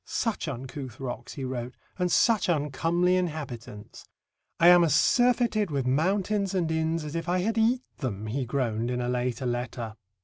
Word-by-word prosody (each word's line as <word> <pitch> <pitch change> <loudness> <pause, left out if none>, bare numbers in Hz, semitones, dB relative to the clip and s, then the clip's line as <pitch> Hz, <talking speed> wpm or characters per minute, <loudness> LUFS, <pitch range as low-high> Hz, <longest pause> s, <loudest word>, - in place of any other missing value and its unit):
"Such 225 -7 -2
uncouth 130 -2 -6
rocks," 130 -2 -6
he 135 - -6
wrote, 125 -1 -5 0.2
"and 180 -1 +1
such 225 -5 +3
uncomely 165 +4 +1
inhabitants." 135 -11 -5 0.6
"I 170 +1 +7
am 175 -1 +8
as 160 -3 +3
surfeited 235 - +3
with 140 -4 -1
mountains 195 +8 +1
and 170 -3 0
inns 160 0 0
as 150 - -6
if 165 +1 -3
I 180 +1 +2
had 220 +4 0
eat 245 +3 +2 0.2
them," 110 -7 -3
he 125 +5 -2
groaned 120 -2 -1
in 125 0 -1
a 120 - -2
later 125 0 -1
letter. 120 -2 -3
150 Hz, 170 wpm, -27 LUFS, 125-180 Hz, 0.6 s, am